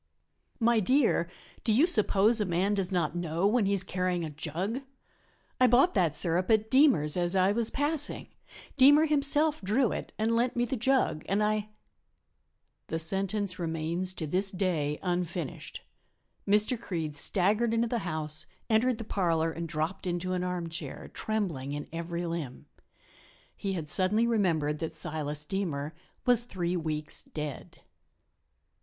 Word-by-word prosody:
"My 235 -1 +3
dear, 225 -5 +2 0.3
do 225 - +1
you 255 +9 +5
suppose 215 - +3
a - - +1
man 185 +3 +1
does 195 -2 -1
not 175 -3 0
know 170 +1 -1
when 215 0 +3
he 200 - +2
is 195 -2 +2
carrying 180 -1 -1
a 155 - -6
jug? 170 - -3 0.8
I 255 - +6
bought 255 +9 +4
that 170 -6 +2
sirup 175 +3 0
at 220 0 +2
Deemer's 260 - +4
as 175 +1 0
I 190 +1 +4
was 225 +1 +1
passing. 295 +1 -2 0.5
Deemer 290 +4 +7
himself 300 +1 +2
drew 220 +5 +1
it - - -5
and 225 +2 +1
lent 240 +1 +1
me 240 0 +1
the 255 - -2
jug, 250 - +1
and 205 +2 +2
I 215 0 0 0.6
" - - -48
The 160 - -2
sentence 195 +3 -2
remains 170 +2 -2
to 160 - -4
this 185 +6 0
day 170 -7 -1
unfinished. 175 -4 -3 0.6
Mr. 210 +4 +3
Creede 165 -8 -3
staggered 205 +9 +1
into 230 +1 +1
the 235 0 -1
house, 155 -5 -2 0.2
entered 230 +2 +3
the 225 - -5
parlor 165 -6 0
and 165 0 -5
dropped 160 +5 -3
into 180 +1 -2
an 180 0 -1
armchair, 175 -2 -5
trembling 170 -11 -2
in 145 0 -5
every 170 +1 -3
limb. 165 -7 -5 0.9
He 195 -1 -3
had 165 -5 -4
suddenly 200 +8 +1
remembered 165 -10 +1
that 160 -1 -4
Silas 150 -1 -2
Deemer 155 -5 -3 0.3
was 245 -2 +5
three 180 -6 -3
weeks 155 -3 -3
dead. 150 -3 -7
185 Hz, 155 wpm, -29 LUFS, 165-220 Hz, 0.9 s, Deemer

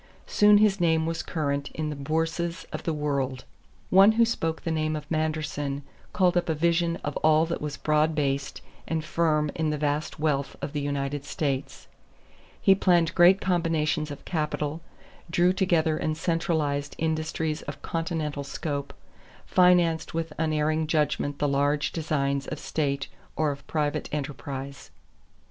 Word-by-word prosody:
Soon 210 0 +5
his 205 -2 +3
name 160 -2 +3
was 165 0 -2
current 140 -3 -2
in 155 -1 -2
the - - -4
bourses 165 +4 -2
of - - -3
the 165 - +1
world. 140 -4 -2 0.5
One 195 +3 +7
who 230 +1 +4
spoke 165 -8 -2
the 165 - -1
name 155 -1 0
of 150 -1 -5
Manderson 150 -3 -2 0.3
called 180 -2 +2
up 175 -1 +1
a 160 - +1
vision 170 +1 +2
of 145 - -3
all 155 +1 +4
that 170 +1 -4
was 150 -1 -4
broad 155 +1 +2
based 140 -2 -1 0.3
and 160 -1 -2
firm 155 -3 +1
in 160 -1 -1
the 150 - -1
vast 150 +1 -2
wealth 145 -3 0
of 140 - -5
the 145 - -1
United 140 0 -2
States. 140 -2 -3 0.7
He 195 - +6
planned 175 -3 +3
great 185 +2 +6
combinations 165 -4 0
of 145 - -9
capital, 155 -1 -2 0.5
drew 175 +2 +3
together 170 -5 +2
and 155 -1 -2
centralized 160 -4 -1
industries 160 -1 -1
of - - -8
continental 160 -3 -2
scope, 140 0 -4 0.5
financed 175 -3 +3
with 165 -1 -2
unerring 155 0 +1
judgment 150 -2 0
the 145 - +1
large 145 +1 +1
designs 140 -4 -1
of 155 - -4
state 140 -2 -2 0.3
or 155 -2 +1
of 140 0 -9
private 150 -2 -1
enterprise. 140 -2 -5
155 Hz, 155 wpm, -26 LUFS, 145-165 Hz, 0.7 s, One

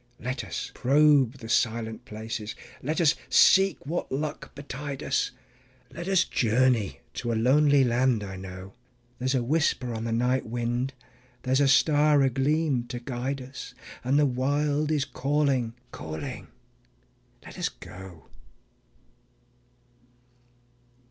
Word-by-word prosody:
Let 130 +2 -3
us - - -5
probe 140 -2 +4
the 115 -4 -9
silent 115 -1 0
places, 110 0 -6 0.3
let 155 +6 -2
us 160 -3 +5 0.2
seek 195 -5 +5
what 165 +5 -3
luck 145 +2 -3
betide 140 0 -6
us; 135 - 0 0.6
Let 170 +2 -6
us 190 -2 +4
journey 120 - +1
to 120 - -3
a - - 0
lonely 140 +4 +4
land 120 -2 +2
I 95 -1 -6
know. 95 0 -9 0.5
There's 130 +2 0
a 125 - +1
whisper 135 -3 0
on 110 0 -4
the 115 - -2
night 125 +3 +1
wind, 120 +3 -2 0.5
there's 130 +2 +2
a 140 - +4
star 145 +1 +4
agleam 135 0 +1
to 120 -1 -5
guide 130 +2 -4
us, 130 +2 -9 0.3
And 130 +3 +2
the 150 - +5
Wild 145 +3 0
is 145 -3 +1
calling, 135 -4 0 0.2
calling.. 80 0 -6 1.0
.let - - -10
us - - 0
go. 95 -3 -12
130 Hz, 130 wpm, -27 LUFS, 115-145 Hz, 1.0 s, us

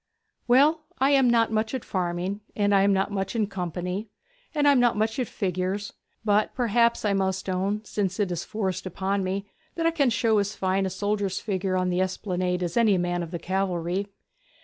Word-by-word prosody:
'Well, 295 +6 +4
I 270 +2 +3
am 270 -3 +5
not 230 -1 +3
much 220 +3 0
at 255 - -5
farming, 180 +2 -2
and 205 -1 +2
I 195 - +5
am 200 +1 +4
not 195 +1 +1
much 195 +2 -3
in 220 -2 +2
company, 180 +1 -4 0.5
and 290 -1 +3
I - - +8
am 275 - +4
not 240 -3 +3
much 220 +3 0
at 250 - 0
figures, 190 +1 -2 0.3
but 210 0 +2
perhaps 235 -1 +2
I 205 - +2
must 190 -1 -1
own, 195 +3 -1
since 200 -1 -2
it 200 -3 +1
is 175 -1 -2
forced 190 -4 -3
upon 195 +2 -1
me, 195 +2 -2 0.3
that 330 - -1
I 330 - +4
can 290 -6 +2
show 225 -2 +2
as 205 +1 -2
fine 190 0 0
a - - -2
soldier's 200 0 -1
figure 190 -2 -1
on 185 0 0
the 180 +1 +1
Esplanade 185 -1 -1
as 175 -1 -3
any 220 -5 +4
man 175 0 -1
of 170 - -5
the 170 - -4
cavalry.' 185 +1 -1
200 Hz, 205 wpm, -26 LUFS, 185-220 Hz, 0.5 s, I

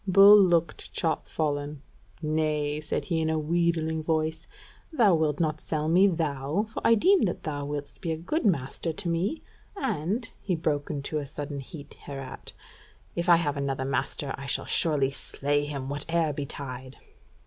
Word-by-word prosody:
Bull 195 +2 +9
looked 170 -4 +1
chopfallen: 150 -3 -2 0.4
"Nay," 155 -1 0
said 155 - -3
he 165 -4 0
in 160 - 0
a 160 - +1
wheedling 160 0 0
voice, 160 0 -1 0.4
"thou 230 - +4
wilt 155 -3 +1
not 155 -2 0
sell 155 -1 -2
me, 180 +5 +5
thou? 160 +1 -1
For - - -4
I 230 - +6
deem 370 - +4
that 175 - -3
thou 145 -2 -3
wilt 145 -1 -5
be 170 - -2
a 160 - -1
good 245 - -2
master 165 - 0
to 185 +3 -4
me: 175 - -1 0.3
and," 225 - -1
he 185 - 0
broke 150 -3 -1
into 150 0 -3
sudden 145 0 -5
heat 145 +2 -10
hereat, 135 -2 -7 0.6
"if 170 +1 -1
I 170 - +9
have 150 -4 0
another 135 -1 -2
master 135 +1 -2
I 140 - -7
shall - - -1
surely 145 -5 +3
slay 145 +1 -1
him 140 -3 -4
whate'er 155 +2 -1
betide." 130 -2 -6
155 Hz, 160 wpm, -27 LUFS, 145-170 Hz, 0.6 s, Bull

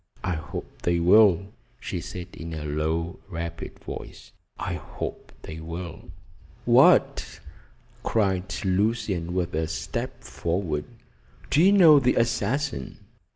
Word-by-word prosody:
"I 95 - 0
hope 80 -3 -7
they 85 -1 +1
will," 95 +1 +5 0.3
she - - -4
said 90 0 -7
in 85 -1 -7
a 75 -1 -5
low, 80 +3 -2
rapid 85 -2 -6
voice. - - -9 0.3
"I - - -3
hope - - -6
they 80 +1 -7
will." 85 +1 -7 0.6
"What!" - - +4 0.6
cried 95 -4 0
Lucian, 95 -3 0
with 90 -1 -1
a 80 +1 0
step 80 0 -4
forward. 85 -3 -2 0.7
"Do 150 - +5
you 190 +3 +7
know 165 -7 +8
the 125 -2 +2
assassin?" 120 - -1
90 Hz, 120 wpm, -26 LUFS, 80-105 Hz, 0.7 s, know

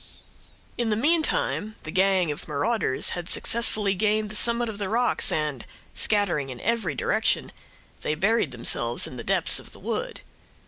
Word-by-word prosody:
In 235 -2 +1
the 210 - +2
meantime, 285 -5 +1
the 155 - -6
gang 185 -3 +3
of 145 - -6
marauders 155 - +1
had 175 -1 -3
successfully 215 -3 +1
gained 210 +2 +1
the 215 - -5
summit 235 +2 +2
of 215 -2 -6
the 200 -2 -2
rocks, 240 +3 +1
and, 150 -5 -1 0.3
scattering 185 -10 +1
in 125 -2 -7
every 220 -9 0
direction, - - +1 0.5
they 150 - -1
buried 205 +1 +2
themselves 120 -1 +1
in 125 - -8
the 115 - -6
depths - - +1
of - - -13
the - - -10
wood. - - -3
200 Hz, 165 wpm, -25 LUFS, 150-225 Hz, 0.5 s, gang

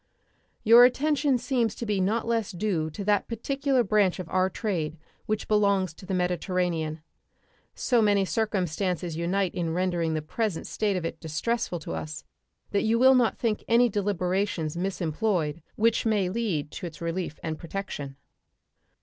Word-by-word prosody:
Your 230 +2 +8
attention 280 +1 +3
seems 240 -4 0
to 235 - -5
be 205 -3 0
not 215 +5 0
less 230 -3 0
due 175 -4 -1
to 200 +6 -6
that 205 0 +2
particular 270 +3 0
branch 205 -3 +2
of 185 -3 -6
our 185 0 +2
trade 170 -7 -2 0.3
which 215 0 -2
belongs 200 -4 +2
to 185 - -14
the 195 - -2
Mediterranean. 180 -3 -1 0.7
So 245 -3 +2
many 205 -2 +3
circumstances 185 -5 -1
unite 180 +3 0
in 165 -2 -2
rendering 175 -3 0
the 155 - -2
present 205 +2 -2
state 205 -3 -1
of 175 - -3
it 165 - -4
distressful 205 +6 -2
to 115 - -5
us 80 -1 -5 0.5
that 200 - +2
you 225 +1 +2
will 260 +2 +7
not 245 -3 +3
think 220 -3 -1
any 240 +1 +5
deliberations 190 -4 -1
misemployed 170 -2 -1
which 230 +1 +2
may 210 -5 +1
lead 185 -9 -2
to 180 - -5
its 160 -2 -11
relief 170 -1 -3
and 160 -1 -3
protection. 165 -6 -5
195 Hz, 160 wpm, -27 LUFS, 170-220 Hz, 0.7 s, Your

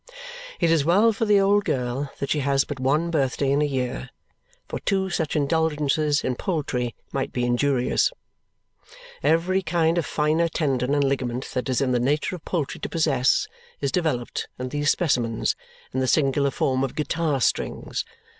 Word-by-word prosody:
It 170 -2 +3
is 165 -3 +3
well 200 +8 +4
for 225 +2 -1
the 205 -2 +5
old 200 +1 +3
girl 130 -1 -2
that 140 - -3
she 150 - +2
has 135 -1 +2
but 145 -3 -6
one 150 +6 +1
birthday 135 -2 +1
in 140 +1 +2
a - - +3
year, 125 -2 -3 0.6
for - - -4
two 190 -1 0
such 160 -2 -1
indulgences 150 -1 +1
in 130 - 0
poultry 130 -9 -2 0.2
might 135 -1 -2
be 125 -1 -1
injurious. 125 +1 +2 1.1
Every 165 +6 +2
kind 165 0 +1
of 165 - -2
finer 155 +2 +1
tendon 135 -4 0
and 145 - +2
ligament 130 -2 -2
that 125 0 -2
is 130 - +1
in 130 -2 +1
the 125 - +2
nature 145 +8 0
of 175 - -11
poultry 160 -7 -2
to - - -4
possess 150 - +2 0.3
is - - -1
developed 155 -10 -1
in 125 0 -4
these 145 +1 0
specimens 120 -10 +1 0.4
in 130 - 0
the 130 - +1
singular 140 +1 +2
form 130 -1 0
of 135 - -3
guitar 155 -1 0
strings. - - -1
145 Hz, 175 wpm, -24 LUFS, 130-165 Hz, 1.1 s, the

